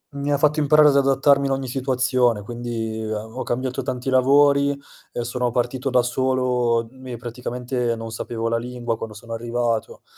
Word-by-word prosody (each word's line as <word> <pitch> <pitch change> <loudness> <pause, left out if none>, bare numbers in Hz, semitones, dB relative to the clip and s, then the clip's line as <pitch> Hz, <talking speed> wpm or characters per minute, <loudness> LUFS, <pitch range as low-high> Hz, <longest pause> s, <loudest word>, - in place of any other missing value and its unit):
Mi 140 +1 -2
ha 145 - +3
fatto 150 +2 +2
imparare 150 0 +6
ad 140 - +2
adattarmi 140 0 +3
in - - -1
ogni 135 -1 -1
situazione, 125 -3 +1
quindi 115 -1 -4
a 110 -1 -3
ho 115 +4 -7
cambiato 130 +2 -2
tanti 125 +1 -3
lavori 140 +2 +4 0.3
e 120 - -3
sono 120 +1 -1
partito 125 +3 -1
da 125 -1 +3
solo, 125 -2 +1
mi 130 -1 -9
e - - -5
praticamente 125 +1 -3
non 115 0 -7
sapevo 115 +1 -4
la 115 0 +1
lingua 120 -1 -3
quando 110 -1 -7
sono 115 +2 -9
arrivato, 115 -1 -2
125 Hz, 175 wpm, -22 LUFS, 115-135 Hz, 0.3 s, imparare